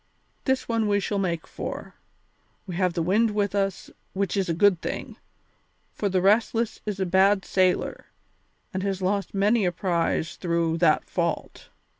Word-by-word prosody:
This 265 Hz, -1 st, 0 dB
one 230 Hz, -2 st, +1 dB
we 205 Hz, 0 st, +2 dB
shall 200 Hz, 0 st, -2 dB
make 170 Hz, -4 st, -1 dB
for. -, -, -6 dB, 0.7 s
We 185 Hz, -, -6 dB
have 180 Hz, -1 st, +1 dB
the 165 Hz, -, -1 dB
wind 210 Hz, +5 st, +2 dB
with 205 Hz, -1 st, 0 dB
us, 195 Hz, -2 st, -1 dB, 0.2 s
which 195 Hz, +1 st, -1 dB
is 195 Hz, -3 st, 0 dB
a -, -, +2 dB
good 190 Hz, -1 st, +4 dB
thing, -, -, -5 dB, 0.8 s
for 205 Hz, -, -1 dB
the 185 Hz, -1 st, +1 dB
Restless 225 Hz, +3 st, +2 dB
is 205 Hz, -2 st, -3 dB
a 190 Hz, -, +1 dB
bad 190 Hz, +2 st, +3 dB
sailer 185 Hz, -1 st, 0 dB, 0.7 s
and 190 Hz, -, -2 dB
has 195 Hz, -1 st, -2 dB
lost 200 Hz, +2 st, -1 dB
many 205 Hz, +3 st, +3 dB
a 180 Hz, -, +2 dB
prize 170 Hz, -2 st, -1 dB
through 170 Hz, -2 st, 0 dB
that 160 Hz, -3 st, +3 dB
fault. 170 Hz, -2 st, -3 dB
195 Hz, 165 wpm, -25 LUFS, 180-205 Hz, 0.8 s, good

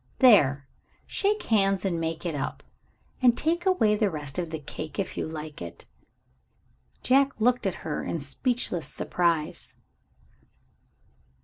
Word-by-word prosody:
There! 145 Hz, -, +5 dB, 0.4 s
Shake 420 Hz, +1 st, 0 dB
hands 195 Hz, -3 st, +2 dB
and 175 Hz, -3 st, 0 dB
make 165 Hz, +1 st, -3 dB
it 170 Hz, -, -1 dB
up. 140 Hz, -, -4 dB, 0.6 s
And 245 Hz, -2 st, +5 dB
take 340 Hz, +4 st, 0 dB
away 295 Hz, -, +4 dB
the 210 Hz, -1 st, +2 dB
rest 150 Hz, -1 st, -5 dB
of 170 Hz, -2 st, -3 dB
the 160 Hz, -, -4 dB
cake, 155 Hz, +1 st, -7 dB
if 195 Hz, -, -2 dB
you -, -, -2 dB
like 155 Hz, -, -7 dB
it." 85 Hz, -1 st, -8 dB, 1.2 s
Jack 275 Hz, 0 st, +3 dB
looked 245 Hz, -1 st, +2 dB
at 185 Hz, -, -2 dB
her 155 Hz, -, -2 dB
in 165 Hz, -, -3 dB
speechless 175 Hz, -, -1 dB
surprise. 165 Hz, -3 st, -1 dB
180 Hz, 135 wpm, -27 LUFS, 155-245 Hz, 1.2 s, There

